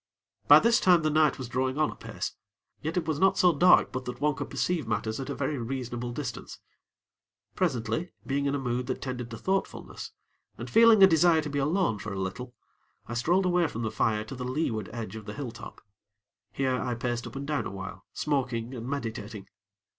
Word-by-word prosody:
By -, -, +10 dB
this 235 Hz, +2 st, +4 dB
time 180 Hz, -7 st, +5 dB
the 155 Hz, -, +2 dB
night 155 Hz, -1 st, +3 dB
was 130 Hz, -, -6 dB
drawing 130 Hz, +2 st, -1 dB
on 155 Hz, 0 st, +2 dB
apace; -, -, -6 dB, 0.5 s
yet 160 Hz, +3 st, -3 dB
it 165 Hz, -3 st, -1 dB
was 155 Hz, -2 st, -1 dB
not 190 Hz, +2 st, +4 dB
so 180 Hz, -2 st, +5 dB
dark 180 Hz, +5 st, +5 dB
but 130 Hz, -1 st, -4 dB
that 125 Hz, 0 st, -6 dB
one 150 Hz, +1 st, +2 dB
could -, -, -6 dB
perceive 170 Hz, -8 st, -1 dB
matters 110 Hz, 0 st, -2 dB
at 135 Hz, -, -5 dB
a -, -, -3 dB
very 140 Hz, 0 st, -2 dB
reasonable 120 Hz, 0 st, -4 dB
distance. 125 Hz, -2 st, -6 dB, 1.0 s
Presently, 115 Hz, +8 st, -1 dB
being 140 Hz, +1 st, 0 dB
in 140 Hz, -, 0 dB
a -, -, -1 dB
mood 125 Hz, -1 st, -2 dB
that 130 Hz, -, -2 dB
tended 125 Hz, -3 st, -5 dB
to 115 Hz, -, -7 dB
thoughtfulness, 190 Hz, -, -3 dB, 0.5 s
and -, -, -7 dB
feeling 225 Hz, -3 st, +7 dB
a -, -, +13 dB
desire 165 Hz, -2 st, +4 dB
to 150 Hz, -, -5 dB
be 145 Hz, -, -1 dB
alone 145 Hz, -, +1 dB
for 105 Hz, +2 st, -6 dB
a 100 Hz, -, -4 dB
little, 120 Hz, +7 st, -5 dB, 0.5 s
I 120 Hz, -, -5 dB
strolled 175 Hz, +11 st, +2 dB
away 180 Hz, -2 st, +3 dB
from 115 Hz, -4 st, -5 dB
the 110 Hz, -, -2 dB
fire 105 Hz, -2 st, +1 dB
to 135 Hz, -, -9 dB
the 125 Hz, -1 st, -6 dB
leeward 125 Hz, -4 st, -2 dB
edge 110 Hz, -4 st, -6 dB
of 110 Hz, -2 st, -8 dB
the -, -, -6 dB
hilltop. 120 Hz, -5 st, -8 dB, 0.7 s
Here, 130 Hz, -2 st, 0 dB
I 125 Hz, -2 st, -2 dB
paced 120 Hz, 0 st, -3 dB
up -, -, -11 dB
and 140 Hz, +1 st, -4 dB
down 150 Hz, 0 st, -1 dB
awhile, 95 Hz, -1 st, -7 dB
smoking 130 Hz, -5 st, -2 dB
and 120 Hz, -1 st, -6 dB
meditating. 110 Hz, -6 st, -5 dB
130 Hz, 205 wpm, -28 LUFS, 120-155 Hz, 1.0 s, a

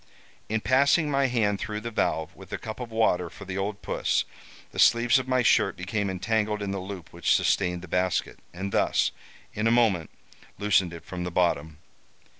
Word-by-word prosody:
In 110 Hz, 0 st, 0 dB
passing 140 Hz, +5 st, +3 dB
my 140 Hz, -1 st, +2 dB
hand 105 Hz, -5 st, +1 dB
through 105 Hz, -1 st, -4 dB
the 115 Hz, +1 st, -5 dB
valve, 80 Hz, -7 st, -1 dB
with -, -, -14 dB
a -, -, -2 dB
cup 110 Hz, +1 st, -7 dB
of 125 Hz, -2 st, -5 dB
water 100 Hz, -6 st, +1 dB
for -, -, -11 dB
the 95 Hz, -1 st, -5 dB
old 100 Hz, +1 st, -3 dB
puss, -, -, 0 dB, 0.5 s
the -, -, -7 dB
sleeves 120 Hz, +2 st, +5 dB
of 130 Hz, -, -5 dB
my 130 Hz, -1 st, +2 dB
shirt -, -, +3 dB
became 100 Hz, +2 st, -2 dB
entangled 105 Hz, +2 st, -1 dB
in 100 Hz, -, -3 dB
the 100 Hz, -, -3 dB
loop 95 Hz, -3 st, -8 dB
which -, -, +2 dB
sustained 90 Hz, -2 st, +1 dB
the -, -, -8 dB
basket, 90 Hz, +1 st, -1 dB
and 95 Hz, +3 st, -5 dB
thus, -, -, +2 dB, 0.4 s
in 105 Hz, +2 st, 0 dB
a -, -, +4 dB
moment, 110 Hz, -9 st, +2 dB, 0.5 s
loosened 95 Hz, -4 st, +2 dB
it 85 Hz, -1 st, -10 dB
from 90 Hz, -1 st, -5 dB
the 90 Hz, -, -3 dB
bottom. 80 Hz, -3 st, 0 dB
100 Hz, 195 wpm, -26 LUFS, 90-115 Hz, 0.5 s, sleeves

